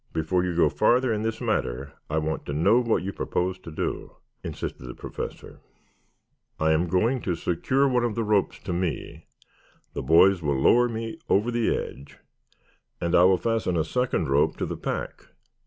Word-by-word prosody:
Before 80 +3 0
you 90 -2 -2
go 85 - +4
farther 120 - +2
in 105 - -2
this 110 0 -2
matter 70 - -2 0.2
I 75 - -1
want 80 0 -2
to 70 - -3
know 100 +10 +4
what 115 -6 0
you 100 +1 -4
propose 90 +1 -2
to 90 - -10
do," 75 - -4 0.3
insisted 65 - -6
the - - -7
Professor. - - -7 1.0
"I 80 0 +2
am 80 +3 +2
going 115 +9 +1
to 90 - -1
secure 130 - +1
one 125 -2 +1
of 120 -3 -1
these 115 -1 -1
ropes 105 -2 +1
to 90 - -3
me. 85 -5 -4 0.7
The - - -3
boys 85 +7 +5
will 70 -3 0
lower 120 - +4
me 115 0 -5
over 105 +5 +2
the 120 -1 +1
edge 70 +1 -8 0.8
and 85 0 -2
I 90 - +6
will 95 0 +5
fasten 110 -6 -1
a 80 - +2
second 125 -2 -1
rope 70 +2 +2
to - - -2
the - - -4
pack. - - -5
90 Hz, 185 wpm, -25 LUFS, 80-115 Hz, 1.0 s, I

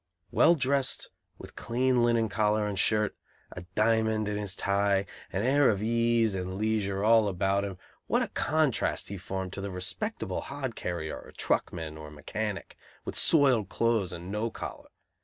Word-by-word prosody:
Well 170 - +5
dressed, 135 -2 0 0.3
with - - -12
clean 125 +1 +1
linen 115 -1 +2
collar 105 0 +1
and 100 -2 -2
shirt, 105 +1 +1 0.4
a 90 - -9
diamond 110 -1 +2
in 105 - -2
his 105 -2 -3
tie, 100 -1 +1 0.3
an 95 +3 -1
air 135 +2 +4
of 105 -1 0
ease 115 -1 +2
and 95 0 -4
leisure 105 -2 -1
all 110 -1 +5
about 100 +1 0
him, 100 -2 -5 0.3
what - - +2
a - - -3
contrast 155 -4 0
he 100 - -5
formed 95 +1 -5
to 100 - -5
the 100 - -4
respectable 100 - -3
hod 135 -4 -5
carrier 85 -3 -4
or - - -13
truckman 80 -2 -2
or 75 -1 -9
mechanic, 100 +7 -5 0.3
with - - -4
soiled 130 - +5
clothes 115 -6 +1
and 90 +2 -7
no 105 +3 -1
collar! - - -8
105 Hz, 165 wpm, -28 LUFS, 95-115 Hz, 0.4 s, Well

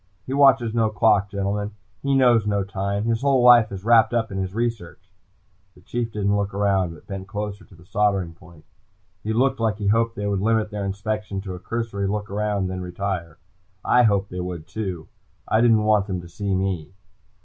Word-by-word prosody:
He 130 - -4
watches 135 -5 +4
no 115 -2 +2
clock, 105 -2 +2
gentlemen. 100 +1 -3 0.3
He 140 0 +1
knows 120 -5 +4
no 100 -1 +1
time. 100 +1 -3
His 115 0 0
whole 135 -3 +3
life 120 -3 +7
is 95 -1 -7
wrapped 115 0 +5
up 115 -2 0
in 95 - -3
his 95 +1 -4
research!" 110 -5 -4 0.6
The 90 - -19
Chief 115 +4 -3
didn't 100 -1 0
look 100 -1 -2
around, 95 -4 +1
but - - -17
bent 95 -1 -7
closer 105 0 -5
to 100 - -18
the 85 +1 -18
soldering 100 -3 0
point. 85 -2 -18 0.6
He 110 - -2
looked 130 +4 +1
like 110 -2 0
he 100 -2 -1
hoped 115 +1 +1
they 105 - -4
would 100 -2 -1
limit 110 0 +1
their 100 -1 -3
inspection 100 +1 -3
to 95 -1 -6
a 90 - -7
cursory 105 0 -3
look 105 0 -3
about 105 0 -1
and 95 - -1
then 95 0 -4
retire. 90 -3 -4 0.5
I 125 - +5
hoped 100 -4 +2
they 90 - -5
would 90 -3 -5
too, 95 -3 -5 0.4
I 110 - +2
didn't 115 -3 +4
want 105 -2 +2
them 95 -3 -3
to 85 - -11
see 100 +3 -3
me. 95 -2 -3
100 Hz, 205 wpm, -23 LUFS, 95-110 Hz, 0.6 s, life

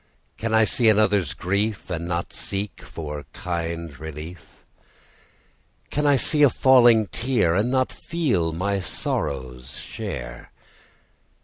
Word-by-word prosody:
Can 115 0 -2
I 110 0 +5
see 115 +1 +3
another's 100 -8 +2
grief, 100 +6 -2
And 85 0 -3
not 85 0 -3
seek 100 +1 -4
for 75 -2 -7
kind 85 -4 -4
relief? 80 +3 -9 1.3
Can 150 0 +1
I 145 - +5
see 150 +3 +2
a 145 - +8
falling 120 -4 +5
tear, 115 -6 0
And 105 +7 +1
not 130 0 +1
feel 125 - -1
my 100 +4 -1
sorrow's 65 -7 -3
share? - - -7
95 Hz, 120 wpm, -24 LUFS, 80-115 Hz, 1.3 s, a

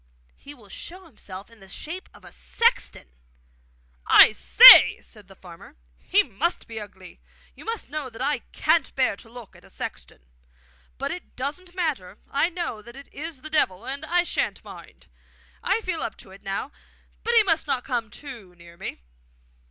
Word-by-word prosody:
'He 290 +1 -13
will 225 -6 -19
show 360 - -10
himself 200 - -11
in 230 - -19
the 195 - -15
shape 335 - -7
of - - -18
a - - -12
sexton!' 470 - 0 1.0
'I - - +8
say!' - - +9
said 210 -3 -15
the 195 - -16
farmer, 175 -3 -15 0.2
'he 65 - +2
must 330 - -3
be 225 -1 -7
ugly! 190 -3 -12 0.3
You - - -15
must 455 - -5
know 300 -3 -5
that 225 - -14
I 280 +3 0
can't 325 -5 +1
bear 260 -6 +1
to 225 - -15
look 240 -3 -13
at - - -18
a - - -18
sexton! - - -9 0.7
But - - -3
it 360 - -9
doesn't 330 +8 -6
matter. 280 - -3
I 285 +5 +1
know 340 -11 -5
that 235 +3 -14
it 275 +1 -14
is 300 -2 -8
the 310 - -8
Devil, 210 -9 0
and 275 +1 -5
I 350 +1 +1
sha'n't - - -3
mind! - - -14 0.6
I 455 - 0
feel 355 -6 -3
up - - -5
to 190 - -14
it 195 - -15
now. 195 +8 -5 0.5
But 470 +1 0
he 450 - +7
must 325 -5 0
not 255 -3 -1
come 240 -4 -3
too 225 -8 -11
near 170 0 -16
me! - - -7
260 Hz, 185 wpm, -24 LUFS, 200-330 Hz, 1.0 s, say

